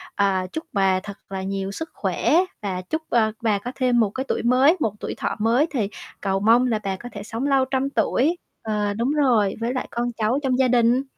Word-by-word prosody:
à, 190 -2 +1
chúc 320 - -3
bà 190 -2 +3
thật 200 +1 -9
là 190 -1 -4
nhiều 195 0 -3
sức 320 +10 -6
khỏe - - 0 0.3
và 190 -3 -3
chúc, 315 - -3
ơ, 220 -2 +3
bà 220 -3 +2
có 245 +5 -5
thêm 250 -2 +2
một 220 -3 +3
cái 260 +6 -4
tuổi - - -1
mới, 260 +8 +4
một 220 -9 0
tuổi - - -4
thọ - - -2
mới 235 +8 +3
thì 215 -8 -1 0.3
cầu 195 -1 0
mong 230 +5 +4
là 225 -3 0
bà 195 -1 -1
có 240 +6 -9
thể 205 - -6
sống 225 +5 -3
lâu 270 -2 +3
trăm 265 +1 -1
tuổi 295 +4 +1 0.2
ờ, 210 -2 -1
đúng 235 +6 0
rồi 245 -10 +2
với 235 +2 -1
lại 255 - -3
con 240 +1 -1
cháu 230 +4 +1
trong 255 -2 +1
gia 260 - +4
đình. 245 +1 +3
230 Hz, 230 wpm, -23 LUFS, 200-260 Hz, 0.3 s, mới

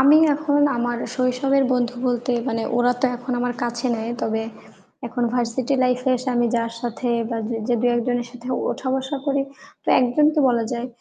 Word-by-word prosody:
আমি 280 +3 +7 0.2
এখন 290 -1 +1 0.2
আমার 240 0 -1 0.2
শৈশবের 265 +2 +2
বন্ধু 250 -1 0
বলতে 245 0 0 0.2
মানে 225 -2 -1
ওরা 245 0 +4
তো 265 - +4
এখন 245 +1 -5
আমার 245 0 -1
কাছে 240 +1 -2
নেয়। 225 +1 -3
তবে 220 0 0 0.6
এখন 245 +1 -3
ভার্সিটি 245 +2 0
লাইফ 250 0 +1
এ - - +4
এসে 255 +2 -5
আমি 240 0 +3
যার 230 0 -1
সাথে 240 +1 -3 0.2
বা 230 - -1
জ - - -6 0.2
যে 245 - +3
দু 245 - +2
একজনের 240 0 -1
সাথে 245 0 -10 0.2
ওঠা 260 - -4
বসা 265 +2 -2
করি, 280 -1 +2 0.4
তো - - -9
একজনকে 300 +5 +3
বলা 235 -2 +2
যায় 240 +1 -3
245 Hz, 190 wpm, -22 LUFS, 240-260 Hz, 0.6 s, আমি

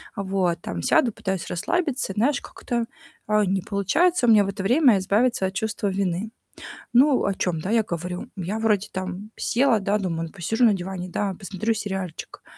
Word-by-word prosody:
А, 200 - -3
вот, 185 -3 0
там, 85 - -5
сяду, 235 - +3
пытаюсь 190 -4 -4
расслабиться, 265 - -1
и - - -21
знаешь, 275 +6 +2
как-то, 235 -1 -4 0.4
а, 210 0 +3
не 190 +1 +1
получается 240 - +1
у - - +6
меня 210 -3 +6
в - - -4
это 195 0 -4
время 245 +1 +5
избавиться 205 +3 +1
от 190 - -2
чувства 210 0 -2
вины. 190 +2 -2 0.6
Ну 265 +2 +5
о 200 - +1
чём, 180 -3 -1
да, 185 +7 -3
я 230 - +4
говорю. 180 +3 -5
Я 195 +4 -3
вроде 210 -3 +1
там 190 +3 -5
села, 245 -2 +2
да, 200 +1 +1
думаю: 170 -5 -2
"Ну - - -13
посижу 225 +7 +1
на 215 -3 +5
диване, 185 0 -5
да, 195 +2 -1
посмотрю 200 +3 -2
сериальчик". 190 -5 -5
200 Hz, 190 wpm, -24 LUFS, 185-225 Hz, 0.6 s, у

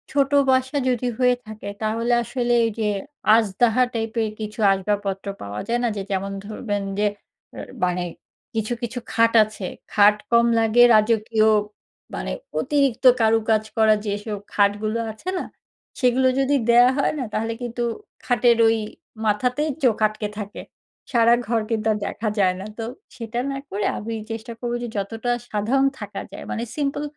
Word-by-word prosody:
ছোট 275 0 +1 0.2
বাসা 260 +2 +1
যদি 250 0 0
হয়ে 250 -1 +4
থাকে 215 -1 -9
তাহলে 230 +2 0
আসলে 240 0 -1
এই - - +1
যে 220 - 0 0.5
আজদাহা 225 +3 +3
টাইপের 225 -1 -1
কিছু 215 0 -6
আসবাবপত্র 195 0 -2
পাওয়া 100 +1 -6
যায় 240 +1 0
না - - +2
যে - - -2
যেমন 195 +1 -1
ধরবেন 205 -1 -3 0.2
যে, 210 - +2 0.8
মানে 180 0 -1 0.5
কিছু, 220 +1 -1
কিছু 240 +1 -4
খাট 230 0 +4
আছে, 215 -2 -7 0.3
খাট 210 0 +6 0.2
কম 235 0 +5
লাগে 225 +1 +4
রাজকীয় 215 0 +3 0.7
মানে - - -4 0.3
অতিরিক্ত 275 - 0
কারুকাজ 220 -1 +2
করা 220 -1 +5
যেসব 205 +1 -3 0.2
খাটগুলো 210 +2 +1
আছে 220 +12 -7
না, - - -2 0.6
সেগুলো 255 +1 +3
যদি 275 +1 +2
দেওয়া 245 +2 +7
হয় 280 - +1
না - - -1
তাহলে 225 +1 -1
কিন্তু 240 0 -3 0.4
খাটের 240 -1 +3
ওই 225 0 +3 0.5
মাথাতেই 250 +8 +1
চোখ 240 -4 +4
আটকে 215 0 -5
থাকে 205 0 -6 0.5
সারা 235 -2 +5
ঘর 230 0 +1
কিন্তু 220 -1 -1
আর 210 - 0
দেখা 215 +2 -3
যায় 185 -2 +3
না, 190 - -6
তো 225 - -4 0.3
সেটা 230 0 -4
না 275 - -3
করে 205 +1 -2
আমি 225 +2 -5 0.2
চেষ্টা 225 +1 -6
করব 240 -1 -3
যে, - - -3
যতটা 225 +4 -3 0.2
সাধারণ 240 +6 +1
থাকা - - -6
যায় - - -8
মানে 230 - -2
সিম্পল 285 0 -1
225 Hz, 155 wpm, -23 LUFS, 210-245 Hz, 0.8 s, দেওয়া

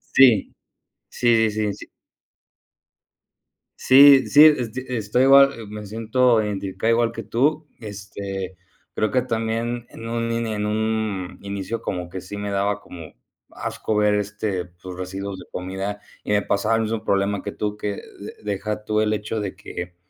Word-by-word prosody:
Sí. 120 -7 +5 0.5
Sí, 115 -2 +3
sí, 105 -1 -1
sí. - - -11 1.9
Sí 135 0 +8
sí, 150 +1 +7
esto 125 +1 -4
estoy 120 +1 +1
igual, 135 -5 +5
me 105 0 -7
siento 115 +2 +2
identificado 100 +2 -2
igual 115 0 +2
que 115 - -6
tú, 145 +8 +1
este, 100 -3 -6 0.4
creo 110 - 0
que 125 - +2
también 115 0 -2
en 115 0 -9
un 115 0 -2
i 115 -1 -2
en 105 0 -2
un 110 -3 -2
inicio 100 +3 -4
como 90 -2 -4
que 95 - -6
sí 95 +3 -8
me 100 0 -4
daba 100 +1 0
como 80 -5 -11 0.4
asco 110 - -4
ver, 105 0 +3
este, 105 -2 -2
pues, 90 +1 -11
residuos 95 +1 -5
de - - -11
comida, 95 +3 -5 0.2
y - - -2
me 105 0 +3
pasaba 110 +3 +1
el 115 - +1
mismo 110 0 -3
problema 100 0 +1
que - - -6
tú, 105 0 -3
que 105 -1 -3 0.2
de 100 - -8
deja 105 +1 -3
tú 105 0 0
el 110 0 +2
hecho 105 +1 -3
de 100 -3 -4
que, 90 0 -7
105 Hz, 160 wpm, -23 LUFS, 100-115 Hz, 1.9 s, Sí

